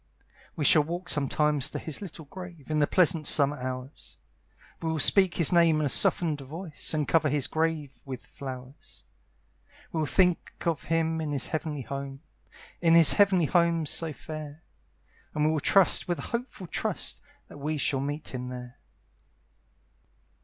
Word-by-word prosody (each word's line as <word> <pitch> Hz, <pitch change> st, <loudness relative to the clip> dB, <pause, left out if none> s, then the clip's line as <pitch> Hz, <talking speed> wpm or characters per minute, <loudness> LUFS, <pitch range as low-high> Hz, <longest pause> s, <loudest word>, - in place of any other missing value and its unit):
We 150 Hz, -, -2 dB
shall 155 Hz, -, +6 dB
walk 175 Hz, +4 st, -5 dB
sometimes 150 Hz, -1 st, +1 dB
to -, -, -5 dB
his 160 Hz, +2 st, -4 dB
little 165 Hz, -5 st, -9 dB
grave, 170 Hz, -2 st, -11 dB
In 155 Hz, -, +1 dB
the 145 Hz, -, +2 dB
pleasant 165 Hz, -4 st, +3 dB
summer 145 Hz, -2 st, +3 dB
hours; 130 Hz, +1 st, -7 dB, 0.6 s
We 165 Hz, -, -2 dB
will 160 Hz, -, -1 dB
speak 185 Hz, +4 st, +4 dB
his 170 Hz, -, +2 dB
name 170 Hz, -3 st, +4 dB
in 155 Hz, -, 0 dB
a -, -, 0 dB
softened 155 Hz, +2 st, +2 dB
voice, 155 Hz, +3 st, -4 dB
And 150 Hz, -3 st, -1 dB
cover 160 Hz, -2 st, +2 dB
his 145 Hz, -1 st, +1 dB
grave 160 Hz, -3 st, -1 dB
with 130 Hz, -3 st, -8 dB
flowers; 130 Hz, 0 st, -10 dB, 0.9 s
We 165 Hz, -, -3 dB
will 155 Hz, -, -1 dB
think 180 Hz, +2 st, +1 dB
of 165 Hz, -2 st, -1 dB
him 165 Hz, 0 st, 0 dB
in 155 Hz, -2 st, -3 dB
his 140 Hz, -3 st, 0 dB
heavenly 155 Hz, -3 st, -4 dB
home, 140 Hz, +2 st, -7 dB, 0.6 s
In 165 Hz, -1 st, +4 dB
his 165 Hz, -2 st, +8 dB
heavenly 190 Hz, -4 st, +3 dB
home 170 Hz, 0 st, +1 dB
so 160 Hz, +2 st, 0 dB
fair; 155 Hz, +2 st, -9 dB, 0.7 s
And 150 Hz, 0 st, +1 dB
we 155 Hz, -, +2 dB
will 155 Hz, -, 0 dB
trust 195 Hz, +6 st, +4 dB
with 175 Hz, -1 st, -1 dB
a -, -, -6 dB
hopeful 235 Hz, -5 st, -5 dB
trust 165 Hz, -, 0 dB, 0.3 s
That -, -, -13 dB
we 155 Hz, +2 st, -3 dB
shall 135 Hz, -1 st, 0 dB
meet 145 Hz, +3 st, -4 dB
him 125 Hz, 0 st, -5 dB
there. 125 Hz, -1 st, -9 dB
155 Hz, 165 wpm, -27 LUFS, 140-165 Hz, 0.9 s, his